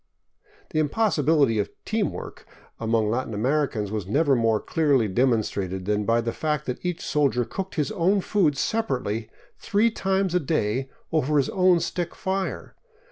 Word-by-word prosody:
The 155 - 0
im 150 -2 +1
possibility 150 - +2
of 100 0 -1
" - - -50
team 220 -1 0
work - - -9 0.2
" - - -30
among 110 -1 +1
Latin 120 -2 -2
Americans 120 -3 0
was 105 -4 -3
never 140 +5 +3
more 115 -2 +2
clearly 140 -7 +2
demonstrated 100 -5 0
than 105 0 0
by 115 +2 +2
the 115 0 -3
fact 150 -1 -2
that 125 -2 -5
each 180 -1 -3
soldier 135 -5 +1
cooked 190 - -5
his 150 -4 0
own 190 +4 +2
food 175 -9 +1
separately 125 - -1 0.3
three 220 +3 +2
times 190 -3 0
a 180 - +3
day 135 -4 -1 0.2
over 150 -1 +1
his 140 - +2
own 185 -2 +4
stick 175 -2 -3
fire. 190 0 -3
140 Hz, 170 wpm, -25 LUFS, 115-175 Hz, 0.3 s, own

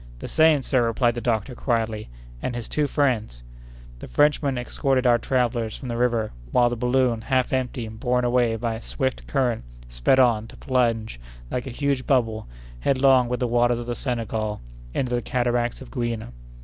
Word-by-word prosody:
"The - - -7
same, 155 -3 +4
sir," 130 -2 +2
replied 120 +1 +2
the 120 - -5
doctor, 115 +1 -1
quietly, 115 -3 -1 0.3
"and 125 - -3
his 120 -2 -4
two 150 -1 0
friends." 120 - 0 0.6
The - - -8
Frenchmen 145 -2 +2
escorted 130 +1 0
our 120 -1 +5
travellers 120 -3 0
from 130 - -7
the 120 - -2
river, 115 -2 +1 0.2
while 120 -1 +4
the 120 - -2
balloon, 125 -1 +1
half 130 +1 0
empty, 125 -2 -1
and 110 0 -9
borne 125 0 +1
away 120 -2 +2
by 115 0 -2
a 110 - -6
swift 130 +3 -3
current, 125 - 0 0.3
sped - - +2
on, 115 -4 +3
to - - -14
plunge, 115 - 0 0.3
like 125 +1 -2
a - - -3
huge 140 0 -1
bubble, 115 -5 +1 0.3
headlong 130 - +4
with 125 +1 -2
the 125 - +2
waters 120 0 +2
of 120 - -5
the 120 - -2
Senegal, 110 -4 -3 0.3
into 125 - -1
the 120 - +1
cataracts 120 -1 -1
of 130 - -11
Gouina. 120 - -3
120 Hz, 185 wpm, -24 LUFS, 115-130 Hz, 0.6 s, our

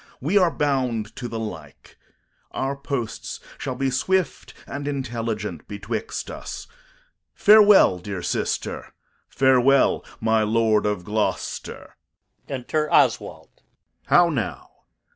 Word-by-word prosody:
We 155 +10 -1
are 185 -4 +5
bound 130 -7 -1
to 125 - -4
the 115 - -5
like. 110 -1 -8 0.6
Our 135 +1 -2
posts 135 -5 -5 0.2
shall 130 - -4
be 135 +1 -1
swift 185 +8 -1
and 145 0 -6
intelligent 115 -6 -4
betwixt 100 -1 -5
us. - - -7 0.7
Farewell, 205 - +6
dear 90 -1 -6
sister; 90 - -3 0.3
farewell, 130 +1 +3 0.2
my 110 0 +2
Lord 110 -1 +2
of 105 -4 -2
Gloucester. 105 +3 -3 0.5
Enter 150 +3 -2
[Oswald - - +1
the] - - -35
Steward. - - -44
How 175 -1 +6
now? 120 - -4
125 Hz, 115 wpm, -23 LUFS, 110-140 Hz, 0.7 s, Farewell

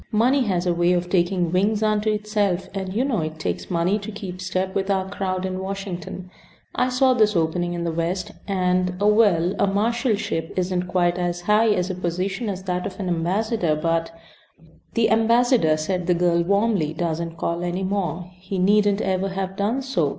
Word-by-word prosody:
Money 245 +6 +3
has 185 -4 0
a 175 - +2
way 175 +1 +2
of 175 0 -1
taking 175 -2 +1
wings 205 +4 +1
unto 215 0 +1
itself, 205 -3 0
and 190 -1 -4
you 230 +7 0
know 250 -8 0
it 155 0 -4
takes 155 - -4
money 180 +3 +1
to 210 +2 -7
keep 190 -3 -7
step 185 0 -2
with 195 0 -1
our 190 -1 +1
crowd 190 -1 -3
in 185 0 -3
Washington. 190 -2 -6 0.4
I 250 - +1
saw 255 +1 +3
this 215 -4 +3
opening 175 +1 0
in 170 - -3
the 170 - -1
West, 170 +3 -2 0.2
and 180 -1 0
well, 205 -4 +3
a 200 - +3
marshalship 210 -4 0
isn't 180 0 -1
quite 175 -1 +1
as 175 0 -2
high 210 +5 +3
a 210 -5 +2
position 185 +5 -2
as 190 -1 -5
that 180 -1 -2
of 190 0 -9
ambassador, 180 0 0
but 165 +1 0 0.4
" 165 0 -27
"The 230 -2 +3
ambassador," 225 - +3
said 175 +3 -2
the 180 - +3
girl, 170 0 +2
warmly, 200 -3 +1
"doesn't 165 0 -3
call 170 +1 -2
any 175 +2 -2
more. 180 -3 -2
He 190 +1 -5
needn't 205 +2 +3
ever 190 0 0
have 190 0 -4
done 220 +7 -1
so. 180 - 0
185 Hz, 185 wpm, -23 LUFS, 175-205 Hz, 0.4 s, Money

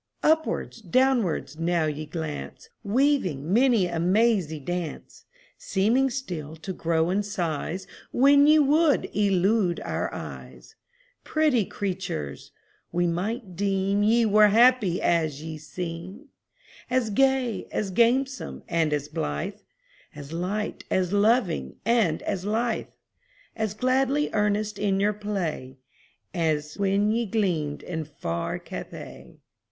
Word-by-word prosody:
Upwards, 315 -6 +1
downwards, 200 - +1
now 170 -1 +1
ye 155 0 -3
glance, 160 -3 -6
Weaving 200 - +1
many 235 -4 +4
a 170 -2 -3
mazy 185 -3 +2
dance; 175 +2 -5 0.3
Seeming 230 +8 +2
still 175 - -5
to 175 +4 -6
grow 165 0 0
in 200 +2 +1
size 180 -2 -3 0.3
When 280 +3 +5
ye 305 +1 +7
would 300 +1 +3
elude 195 -2 +2
our - - -3
eyes - - -9 0.5
Pretty 300 -9 +2
creatures! 180 - -4 0.4
we 175 0 +1
might 185 +3 -3
deem 195 +1 0
Ye 230 +3 +4
were 210 0 +6
happy 225 -4 +4
as 155 -4 0
ye 160 -1 -6
seem 180 - -7 0.6
As 250 -3 +1
gay, 265 0 +1
as 200 -2 -2
gamesome, 255 +5 +1
and 165 -3 +1
as 145 -1 -1
blithe, 75 - -3 0.6
As 145 +2 -9
light, 190 +5 -3
as 185 0 0
loving, 205 - +2
and 220 -9 +2
as 195 -3 -2
lithe, 225 +3 -1 0.7
As 215 -2 -2
gladly 265 +4 +1
earnest 210 0 0
in 195 -2 +1
your 205 +1 +2
play, 180 -11 -4 0.6
As 155 -4 -1
when 200 +1 +2
ye 230 0 0
gleamed 175 -9 -1
in 160 -3 -4
far 85 - -4
Cathay. - - -9
195 Hz, 120 wpm, -26 LUFS, 165-230 Hz, 0.7 s, ye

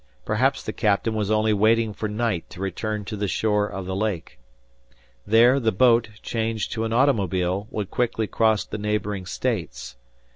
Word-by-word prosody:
Perhaps 130 +6 +1
the - - -4
captain 105 +1 +1
was 105 -2 -1
only 110 0 +2
waiting 110 +1 +2
for 110 +1 -4
night 105 -5 -2
to 90 - -12
return 105 +2 -3
to 105 - -5
the 100 0 -2
shore 105 +2 +1
of 95 -2 -6
the 95 0 -3
lake. 95 - -3 0.9
There, 120 +5 +5
the 115 -4 +1
boat, 115 +2 +4
changed 110 -2 -2
to 110 0 -2
an 110 - -3
automobile, 100 - +1
would 105 -3 -4
quickly 115 -2 0
cross 110 0 +1
the 105 - -6
neighboring 105 -2 -2
States. 90 - -3
105 Hz, 170 wpm, -24 LUFS, 100-115 Hz, 0.9 s, There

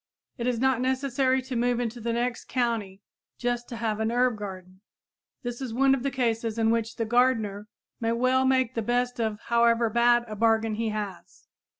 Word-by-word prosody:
It 235 - -1
is 250 -2 +1
not 260 -1 +2
necessary 260 0 +1
to 260 -1 -6
move 240 0 +1
into 240 0 -3
the 235 +1 -1
next 240 0 -2
county 220 -6 -2 0.3
just 245 0 -2
to 235 - -6
have 225 -2 -2
an 220 +1 0
herb 245 0 +2
garden. 190 -2 -9 0.6
This 240 +1 -5
is 245 -4 -4
one 270 +1 +4
of 270 - 0
the 275 - 0
cases 230 -4 -1
in 225 0 +3
which 230 0 -1
the 230 - -2
gardener 220 -4 +1 0.3
may 230 0 0
well 255 +2 +2
make 260 -2 +2
the 230 - -1
best 245 +2 -1
of 220 -2 -1
however 235 -1 +2
bad 240 +1 +4
a 215 - -6
bargain 225 0 +2
he 225 +1 -1
has. 205 -4 -6
235 Hz, 195 wpm, -27 LUFS, 225-250 Hz, 0.6 s, one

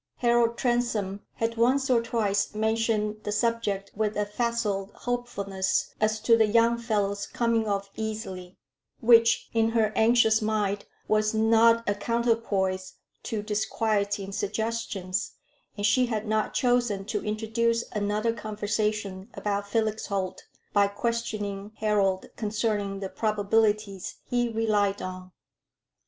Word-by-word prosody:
Harold 235 -1 +2
Transome 235 -6 0 0.2
had 230 0 -2
once 260 +4 +3
or 245 -2 +3
twice 210 -3 0
mentioned 220 -1 0
the 210 - -3
subject 210 -3 -1
with 215 0 -1
a 210 - +1
facile 210 -3 -1
hopefulness 200 -6 -2
as 215 0 +2
to 230 +1 +4
"the 220 -1 +4
young 230 +2 +4
fellow's 205 -3 -1
coming 230 -2 0
off 200 -1 -2
easily," 200 -5 -5 0.4
which, 230 0 +5
in 225 -1 +3
her 220 -2 +1
anxious 220 -1 +4
mind, 210 -2 -1 0.2
was 215 0 +2
not 230 +1 +4
a 205 - +3
counterpoise 205 -4 -1 0.3
to 215 -2 -3
disquieting 205 -2 -1
suggestions, 205 -2 -2 0.4
and 205 - -1
she 250 +4 +4
had 220 -2 -2
not 215 0 0
chosen 245 -6 +1
to - - -3
introduce 230 +2 0
another 210 +2 0
conversation 210 -2 -2
about 200 -1 -2
Felix 220 0 -1
Holt, 190 -2 -3 0.3
by 200 -1 +4
questioning 210 -2 -3
Harold 200 -3 +1
concerning 210 -2 -1
the 195 - -3
probabilities 210 -2 0
he 245 -1 0
relied 210 -3 +1
on. 185 0 -7
215 Hz, 125 wpm, -27 LUFS, 200-230 Hz, 0.4 s, which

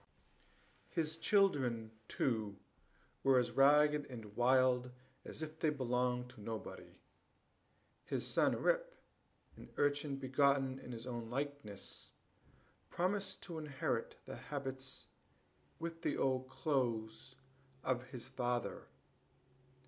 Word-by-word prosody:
His 160 -2 -1
children, 140 - +3 0.2
too, 110 -6 0 0.6
were 135 -1 +5
as 125 -1 +2
ragged 150 +1 +5
and 110 -5 -8
wild 125 0 +4 0.3
as 155 - -6
if 155 0 -7
they 160 - +3
belonged 125 -3 0
to 125 -4 -13
nobody. 110 +1 -6 1.1
His - - -2
son - - +3
Rip, - - +2 0.6
an - - -12
urchin 145 0 +2
begotten 135 0 +2
in 125 - -9
his 115 0 -6
own 120 -2 -4
likeness, 135 -6 -4 0.8
promised 190 +2 -1
to 170 -4 -5
inherit 145 -4 -2
the - - -6
habits, 135 -2 -5 0.7
with 165 0 -5
the - - 0
old 130 -1 +1
clothes 120 -4 -1 0.5
of 130 -1 0
his 125 -1 -7
father. 125 -2 -2
130 Hz, 110 wpm, -37 LUFS, 125-150 Hz, 1.1 s, were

